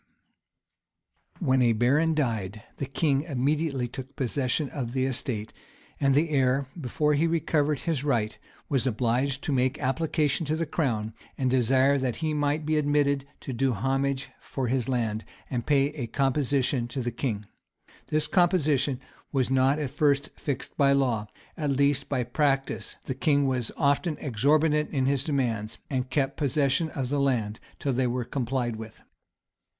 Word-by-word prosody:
] -, -, -37 dB
When 130 Hz, 0 st, +4 dB
a 120 Hz, -2 st, +4 dB
baron 140 Hz, +8 st, +3 dB
died, 110 Hz, -7 st, -1 dB
the 140 Hz, -, -3 dB
king 140 Hz, 0 st, +1 dB
immediately 145 Hz, -2 st, 0 dB
took 130 Hz, +3 st, -9 dB
possession 135 Hz, +2 st, 0 dB
of 125 Hz, -4 st, -4 dB
the 130 Hz, -1 st, +1 dB
estate; 120 Hz, -4 st, -3 dB, 0.5 s
and 135 Hz, -1 st, +3 dB
the 155 Hz, +2 st, +2 dB
heir, 135 Hz, -1 st, +2 dB
before 150 Hz, 0 st, 0 dB
he 155 Hz, +3 st, +2 dB
recovered 155 Hz, -3 st, +1 dB
his 155 Hz, -5 st, -1 dB
right, 115 Hz, -7 st, 0 dB, 0.3 s
was 135 Hz, -3 st, +1 dB
obliged 130 Hz, +4 st, 0 dB
to -, -, -1 dB
make 130 Hz, -1 st, +1 dB
application 150 Hz, +2 st, 0 dB
to 155 Hz, -, +1 dB
the 165 Hz, +1 st, -1 dB
crown, 115 Hz, -9 st, -1 dB, 0.2 s
and 130 Hz, -2 st, +1 dB
desire 130 Hz, +2 st, +3 dB
that 130 Hz, -3 st, -1 dB
he 155 Hz, +3 st, -2 dB
might 150 Hz, +1 st, 0 dB
be 155 Hz, 0 st, +1 dB
admitted 145 Hz, -2 st, +2 dB
to 135 Hz, -, -5 dB
do 130 Hz, +1 st, +1 dB
homage 135 Hz, +4 st, -1 dB
for 130 Hz, -3 st, -3 dB
his 130 Hz, -1 st, 0 dB
land, 115 Hz, -4 st, -1 dB, 0.3 s
and 120 Hz, -3 st, -2 dB
pay 140 Hz, -1 st, +4 dB
a 140 Hz, -6 st, -5 dB
composition 135 Hz, -1 st, +1 dB
to 125 Hz, +3 st, -4 dB
the 120 Hz, -, -1 dB
king. 110 Hz, -6 st, -3 dB, 0.6 s
This 155 Hz, 0 st, +1 dB
composition 155 Hz, -8 st, +2 dB, 0.3 s
was 130 Hz, -3 st, +1 dB
not 135 Hz, +2 st, +3 dB
at 145 Hz, -4 st, -3 dB
first 145 Hz, -1 st, +2 dB
fixed 140 Hz, -3 st, -5 dB
by 140 Hz, -1 st, +5 dB
law, 120 Hz, -6 st, +1 dB, 0.3 s
at 150 Hz, -3 st, -2 dB
least 140 Hz, 0 st, +1 dB
by 130 Hz, -3 st, 0 dB
practice: 135 Hz, +2 st, -1 dB
the 130 Hz, -, -2 dB
king 140 Hz, +2 st, +2 dB
was 130 Hz, -3 st, 0 dB
often 150 Hz, +2 st, +1 dB
exorbitant 150 Hz, +5 st, +2 dB
in 135 Hz, -3 st, 0 dB
his 135 Hz, -1 st, +1 dB
demands, 115 Hz, -8 st, -1 dB
and 130 Hz, -1 st, -1 dB
kept 135 Hz, 0 st, 0 dB
possession 145 Hz, +2 st, +1 dB
of 135 Hz, -4 st, -3 dB
the 145 Hz, +1 st, 0 dB
land 115 Hz, -6 st, 0 dB, 0.2 s
till 140 Hz, -, -1 dB
they 125 Hz, 0 st, +1 dB
were 120 Hz, 0 st, -2 dB
complied 125 Hz, -3 st, -2 dB
with. 110 Hz, 0 st, -10 dB
135 Hz, 165 wpm, -27 LUFS, 125-145 Hz, 0.6 s, by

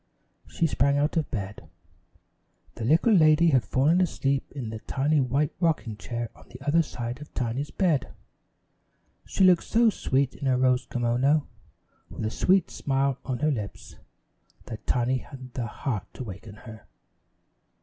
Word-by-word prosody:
She 165 Hz, -, -1 dB
sprang 140 Hz, -2 st, +2 dB
out 145 Hz, +2 st, +1 dB
of 160 Hz, -3 st, 0 dB
bed. 100 Hz, -4 st, -6 dB, 1.0 s
The 115 Hz, -, -7 dB
little 165 Hz, -, +4 dB
lady 160 Hz, -2 st, +5 dB
had 130 Hz, -4 st, +3 dB
fallen 155 Hz, +8 st, +2 dB
asleep 140 Hz, -6 st, -1 dB
in 125 Hz, -6 st, -5 dB
the 110 Hz, -, -6 dB
tiny 145 Hz, +6 st, 0 dB
white 135 Hz, +3 st, 0 dB
rocking 160 Hz, -, 0 dB
chair 120 Hz, +2 st, -5 dB
on -, -, -18 dB
the 125 Hz, -, -11 dB
other 155 Hz, +3 st, +4 dB
side 125 Hz, -3 st, -5 dB
of 150 Hz, -, -11 dB
Tiny's 125 Hz, +4 st, -2 dB
bed. 170 Hz, -9 st, +1 dB, 1.2 s
She -, -, 0 dB
looked 180 Hz, -2 st, +6 dB
so 230 Hz, 0 st, +3 dB
sweet 135 Hz, -7 st, 0 dB
in 140 Hz, -, -5 dB
her 130 Hz, -1 st, +3 dB
rose 125 Hz, -1 st, +2 dB
kimono 125 Hz, +5 st, +1 dB, 0.6 s
with -, -, -5 dB
a 110 Hz, -, -1 dB
sweet 185 Hz, +5 st, +2 dB
smile 135 Hz, -1 st, 0 dB
on 130 Hz, -2 st, -2 dB
her 155 Hz, -, +3 dB
lips, 105 Hz, -7 st, -6 dB, 0.7 s
that 110 Hz, -3 st, -9 dB
Tiny 125 Hz, +1 st, +1 dB
hadn't 130 Hz, -3 st, -11 dB
the 120 Hz, -2 st, -3 dB
heart 105 Hz, -2 st, -4 dB
to -, -, -5 dB
waken 105 Hz, 0 st, -9 dB
her. 110 Hz, -1 st, -12 dB
135 Hz, 160 wpm, -26 LUFS, 120-150 Hz, 1.2 s, looked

